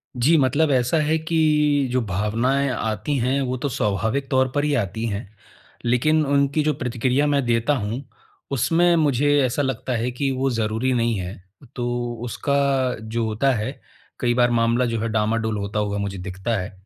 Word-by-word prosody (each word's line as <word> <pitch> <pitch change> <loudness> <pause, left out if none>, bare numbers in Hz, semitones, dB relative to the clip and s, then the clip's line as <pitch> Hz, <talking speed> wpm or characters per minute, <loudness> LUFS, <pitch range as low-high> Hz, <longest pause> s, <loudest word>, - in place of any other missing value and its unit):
जी, 140 +7 +3
मतलब 145 +3 +2
ऐसा 125 +4 +2
है 155 +2 +1
कि 160 +1 -2 0.5
जो 130 0 +1
भावनाएँ 115 +8 0
आती 110 +4 -2
हैं, 130 +3 +1
वो 130 -1 -1
तो 140 +3 -2
स्वाभाविक 110 +3 -1
तौर 130 0 +3
पर 145 - +1
ही 150 -1 +1
आती 110 +4 -4
हैं, 100 0 -5 0.6
लेकिन 150 +6 +2
उनकी 140 +2 +2
जो 150 0 +1
प्रतिक्रिया 130 +3 0
मैं 140 -2 +2
देता 120 +4 +2
हूँ, 115 +4 -3 0.5
उसमें 170 +6 +3
मुझे 145 -2 +2
ऐसा 130 +4 -1
लगता 130 -1 -2
है 120 +2 -1
कि 135 +3 -1
वो 135 +1 0
ज़रूरी 115 +2 -1
नहीं 115 -3 +1
है, 90 +1 -5 0.4
तो 120 -1 -2
उसका 140 +4 -2 0.5
जो 110 +1 -2
होता 110 +5 +1
है, 115 +5 -4 0.4
कई 120 -2 +1
बार 120 0 +3
मामला 115 +1 +2
जो 115 -2 -1
है 115 - -1
डामाडोल 110 0 0
होता 100 +1 -3
हुआ 105 -1 -1
मुझे 100 -1 -3
दिखता 95 +5 -3
है। 90 - -6
125 Hz, 180 wpm, -22 LUFS, 110-140 Hz, 0.6 s, जी